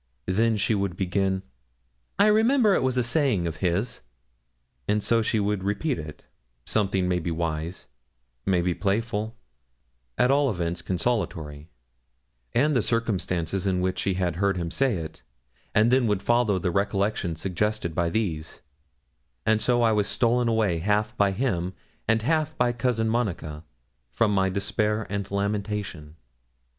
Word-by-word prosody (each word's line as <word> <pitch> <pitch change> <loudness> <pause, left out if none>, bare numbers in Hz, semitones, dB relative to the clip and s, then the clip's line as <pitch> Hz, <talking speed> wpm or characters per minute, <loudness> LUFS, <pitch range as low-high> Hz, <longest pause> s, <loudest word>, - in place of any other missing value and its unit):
Then 110 - +2
she 105 +2 +1
would 100 -3 -1
begin, 95 0 0 0.7
'I 200 - +5
remember 220 +1 +4
it - - +2
was 130 -1 0
a 125 - +3
saying 120 - +1
of 80 -1 -3
his,' 90 +7 -1 0.9
and 105 0 +1
so 115 -1 +3
she 110 0 +1
would 100 -2 0
repeat 105 - -1
it 75 -1 -9 0.4
something 95 -3 +1
maybe 90 -1 0
wise, 80 +1 -3 0.6
maybe 90 +1 +1
playful, 105 +4 -1 0.8
at 125 - +4
all 140 0 +3
events 85 -4 -2
consolatory 85 -7 -2 0.8
and 145 +4 +2
the 125 - +3
circumstances 95 -5 -1
in 95 -1 +1
which 95 0 -1
she 95 -1 0
had 90 -3 -1
heard 100 0 +1
him 85 -1 -3
say 130 +2 +2
it, 80 -3 -6 0.5
and 110 +3 +5
then 130 -2 +4
would 105 -2 0
follow 120 -4 +2
the 90 0 -1
recollections 100 -3 0
suggested 95 0 -1
by 85 0 +1
these; 85 -6 -3 0.8
and 110 0 +3
so 120 -1 +2
I 115 - +4
was 105 -2 +1
stolen 120 0 +2
away 110 -7 +1
half 105 +4 0
by 100 -1 +3
him, 95 -5 -1 0.3
and 110 0 +2
half 155 +3 0
by 125 0 +3
Cousin 120 -2 0
Monica, 85 -10 -2 0.5
from 105 - +1
my 95 -1 +2
despair 105 +2 -1
and 100 -1 -3
lamentation. 100 -6 -3
100 Hz, 150 wpm, -26 LUFS, 90-115 Hz, 0.9 s, I